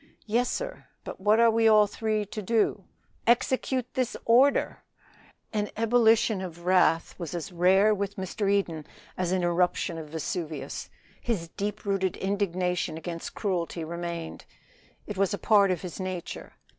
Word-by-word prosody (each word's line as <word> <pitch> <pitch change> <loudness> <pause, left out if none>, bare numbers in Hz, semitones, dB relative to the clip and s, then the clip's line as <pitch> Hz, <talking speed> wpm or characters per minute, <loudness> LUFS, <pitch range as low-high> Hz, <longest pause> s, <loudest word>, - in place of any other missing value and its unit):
"Yes, 235 +3 +1
sir. - - -5 0.2
But - - -8
what 210 +3 +4
are 230 -1 +6
we 225 0 +3
all 215 -1 +7
three 215 0 -2
to 215 +2 -6
do?" 210 -2 +1 0.4
"Execute 255 +1 +2
this 255 -3 -1
order!" 255 +5 +3 0.7
An 210 -1 -1
ebullition 225 -2 +3
of 175 -2 -8
wrath 180 -2 +3
was 170 -1 -5
as 170 +2 -5
rare 190 +4 +4
with 200 -1 -3
Mr. 195 +2 -2
Eden 170 -6 -1 0.3
as 180 -1 -1
an 185 -1 +1
eruption 175 -1 0
of 155 -2 -8
Vesuvius. 160 0 -4 0.3
His 190 -9 -2
deep 205 +4 -4
rooted 195 -2 0
indignation 185 -3 -1
against 165 0 -6
cruelty 175 -4 -2
remained; 170 0 -5 0.6
it 210 - -6
was 195 +1 +1
a - - -9
part 200 -3 +4
of 185 -1 -1
his 180 +1 -7
nature. 185 -2 -5
195 Hz, 150 wpm, -27 LUFS, 175-215 Hz, 0.7 s, all